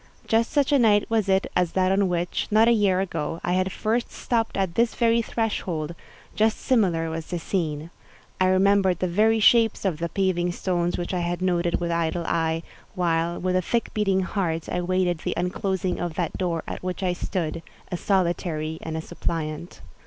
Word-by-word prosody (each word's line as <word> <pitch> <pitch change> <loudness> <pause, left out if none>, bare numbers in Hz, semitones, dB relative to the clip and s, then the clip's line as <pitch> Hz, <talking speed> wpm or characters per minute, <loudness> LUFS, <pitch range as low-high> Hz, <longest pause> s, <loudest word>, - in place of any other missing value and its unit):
Just 225 +1 +2
such 285 -2 +1
a 285 - +5
night 210 -3 +4
was 220 -3 +1
it 190 0 +3
as 180 -2 +1
that 185 0 +2
on 195 -1 +2
which, 175 0 -1
not 220 +2 +5
a - - +6
year 200 -5 +3
ago, 165 -3 -3
I 175 - 0
had 185 +1 +1
first 225 +5 -1
stopped 230 -2 -1
at 190 -3 0
this 230 +3 +1
very 235 -1 +3
threshold; 180 -9 -2 0.4
just 220 0 +2
similar 175 -10 +1
was 160 0 -5
the 175 - -3
scene. 165 -2 -3 0.5
I 185 - +4
remembered 190 -1 +3
the 185 - -1
very 220 +5 +3
shapes 225 -1 +4
of 170 -5 0
the 170 0 -2
paving 180 -1 0
stones 175 -1 -1
which 175 +1 -4
I 180 - 0
had 175 0 -2
noted 175 -2 +1
with 170 -1 -2
idle 170 0 -1
eye, 165 0 0 0.3
while, 170 -1 0
with 185 0 0
a 185 - +3
thick 230 +6 -1
beating 195 -3 +1
heart, 175 -4 -2
I 180 - -2
waited 180 -1 0
the - - -3
unclosing 185 0 -1
of 175 -2 -3
that 170 -3 -2
door 170 -3 -1
at - - -6
which 185 +1 -4
I 180 -1 +1
stood—a 165 -1 -5
solitary 170 -4 -1
and 160 0 -4
a - - -2
suppliant. 160 +1 -4
180 Hz, 190 wpm, -25 LUFS, 170-200 Hz, 0.5 s, a